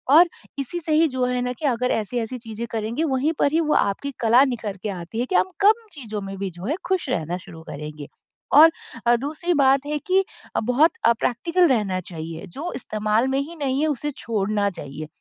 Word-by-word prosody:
और 345 +2 +8 0.3
इसी 310 +6 -3
से 310 - +1
ही 320 +1 +5
जो 255 -2 -1
है 250 0 0
ना 250 0 -1
कि 300 - -6
अगर 250 -2 +1
ऐसी-ऐसी 230 +3 -2
चीज़ें 225 -1 -6
करेंगे 230 +7 -2
वहीं 285 +2 +1
पर 285 - +3
ही 325 - +4
वो 305 -1 +1
आपकी 205 +8 0
कला 235 +4 +6
निखर 220 -6 -3
के 215 - -1
आती 185 +4 -5
है 245 - +1
कि 365 - -3
हम 375 - +3
कम 440 +3 +4
चीज़ों 220 -8 -6
में 195 0 -6
भी 195 -1 -2
जो 175 +2 -9
है 285 +8 0
खुश 370 -7 0
रहना 170 -3 -1
शुरू 170 -3 -12
करेंगे। 150 0 -7 0.5
और 320 +3 +9 0.4
अ, 240 - +6
दूसरी 310 +7 -2
बात 275 0 +4
है 300 0 -1
कि 380 +4 +2 0.3
अ, - - +3
बहुत 250 +8 +3
अ, 235 - +6
प्रैक्टिकल 335 +9 +2
रहना 205 -7 +1
चाहिए। 160 0 -6
जो 295 - -6
इस्तेमाल 215 +1 0
में 270 - +1
ही 315 +5 -5
नहीं 275 -2 -1
है 315 - +2
उसे 295 0 -2
छोड़ना 210 -2 0
चाहिए, 150 -3 -8
250 Hz, 215 wpm, -23 LUFS, 205-295 Hz, 0.5 s, और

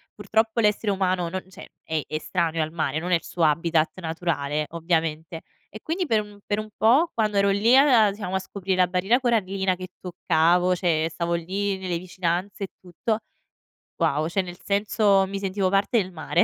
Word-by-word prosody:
purtroppo 220 +3 0
l'essere 210 -1 +2
umano 185 -3 0
non 185 +2 -4
cioè - - -12
è 160 -1 -2
estraneo 165 +1 -1
al 155 - -5
mare, 155 -2 -1
non 180 +2 -4
è - - +5
il 165 - -2
suo 175 - -3
habitat 160 +1 +2
naturale, 155 -3 -2
ovviamente. 165 -1 -2 0.3
E 215 - -10
quindi 350 +3 -1
per 220 -5 +2
un 205 -1 -13
per 205 0 -1
un 215 0 -6
po' 280 +10 +4
quando 215 -3 0
ero 200 0 +4
lì 215 +5 +4
a 265 -5 +6
a 200 - 0
diciamo 195 -2 -5
a - - +2
scoprire 190 0 -3
la 180 -1 +4
barriera 190 +7 +2
corallina 195 -6 0
che 185 0 -8
toccavo, 175 0 +2
cioè 165 -3 +1
stavo 170 +1 -2
lì 190 +4 -2
nelle 185 -2 -3
vicinanze 180 +2 -3
e 195 - -4
tutto 185 +5 -3 0.8
wow, 155 -2 +1
cioè 185 +4 0
nel 180 -1 -9
senso 200 -1 +2
mi 195 +1 -4
sentivo 195 -1 -1
parte 200 +5 +2
del 185 -1 -6
mare 175 +2 +1
185 Hz, 190 wpm, -24 LUFS, 170-205 Hz, 0.8 s, a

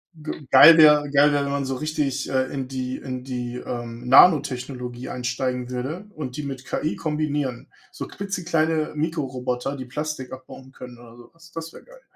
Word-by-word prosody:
G 155 -2 -8
geil 160 +5 +9
wäre 150 -2 +6
geil 145 +1 +5
wäre, 140 -1 +1
wenn 140 - -3
man 140 -1 -1
so 135 0 -2
richtig, 145 -1 -2
äh, 130 -1 +1
in 135 -2 -4
die 130 -1 -4
in 130 -2 -6
die, 125 -2 -5
ähm, 120 0 -6
Nanotechnologie 130 -4 +3
einsteigen 125 0 -3
würde 135 +10 -4
und 135 -4 -6
die 150 - -4
mit 135 -2 -6
KI 155 - -2
kombinieren. 150 -5 -2 0.2
So - - -7
klitzekleine 165 -6 -1
Mikroroboter, 135 -4 -2
die 130 - -6
Plastik 150 -1 -5
abbauen 130 0 -11
können 125 -2 -11
oder 120 0 -15
sowas. 165 +8 -17
Das 165 0 -7
wäre - - -13
geil. - - -18
135 Hz, 175 wpm, -23 LUFS, 125-155 Hz, 0.2 s, geil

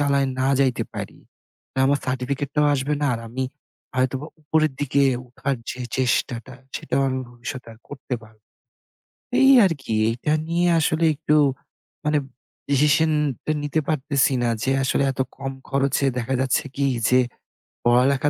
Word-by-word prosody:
চালায় 140 -1 +2
না 130 +1 +2
যাইতে 130 -3 +2
পারি, - - -6 0.5
তো - - -46
আমার 140 +1 +3
সার্টিফিকেটটাও 140 +3 0
আসবে 140 +2 0
না। - - +3
আর 115 - -5
আমি 130 +3 -3 0.5
আ - - -7
হয়তোবা 130 +3 0 0.2
উপরের 155 -1 +2
দিকে 140 0 +2 0.3
উঠার 135 +2 -2
যে 125 - -7 0.2
চেষ্টাটা, 125 -1 0 0.2
সেটাও 135 +2 -1
আমি 130 0 -1
ভবিষ্যতে 120 +2 -7
আর 110 - -17
করতে 140 -3 -5
পা 110 - -14 1.1
এই 270 0 +7
আরকি। 140 -10 -2 0.2
এইটা 125 +6 -1 0.2
নিয়ে 175 +1 +2
আসলে 160 +1 +2
একটু 150 0 +1 0.7
মানে 150 0 +2 0.5
ডিসিশনটা 150 0 +2
নিতে 145 +2 0
পারতেছি 140 -2 +2
না। 120 - +2
যে 135 - +1
আসলে 135 - +1
এত 135 - -11 0.2
কম 135 0 -4 0.2
খরচে 140 0 +1
দেখা 125 +2 -2
যাচ্ছে 135 +3 +1
কি, 140 0 +1 0.2
যে 125 - +5 0.7
পড়ালেখা 130 +4 +4
140 Hz, 150 wpm, -23 LUFS, 130-150 Hz, 1.1 s, এই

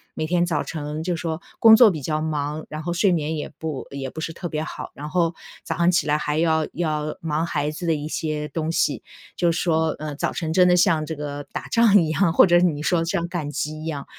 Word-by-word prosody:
每 155 - -2
天 175 0 +2
早 155 -4 -1
晨 150 0 -5
就 175 +1 -1
说 165 +1 -4 0.2
工 225 -1 +9
作 235 -2 +8
比 155 - -4
较 155 +2 -2
忙， 150 0 -3
然 155 0 -6
后 175 0 -2
睡 185 +2 +3
眠 160 -1 -1
也 150 - -4
不 155 -5 -5
也 135 -2 -5
不 160 - -7
是 165 - -3
特 175 +1 -6
别 155 -1 -3
好。 - - -7
然 150 +1 -7
后 170 0 +1 0.3
早 - - -3
上 170 +1 +3
起 180 - +2
来 150 0 +1
还 150 +1 -2
要 160 -1 +2
要 155 -2 -2
忙 160 0 -1
孩 150 -2 -1
子 170 +2 -6
的 160 - +3
一 150 +1 -4
些 155 -1 -3
东 160 0 -2
西， - - 0 0.3
就 170 -2 +2
说， 160 -1 +1
呃 150 -1 -5
早 - - -1
晨 160 -2 -3
真 180 0 +5
的 180 0 +4
像 160 -3 +3
这 160 +1 -5
个 145 0 -5
打 - - -5
仗 225 -4 +5
一 155 - -2
样， 165 +2 +2
或 - - +6
者 175 -1 +5
你 155 -5 +1
说 165 0 +2
像 170 0 -1
赶 170 -4 -4
集 150 +1 -4
一 - - -7
样。 145 -4 -4
160 Hz, 265 characters per minute, -23 LUFS, 150-170 Hz, 0.3 s, 工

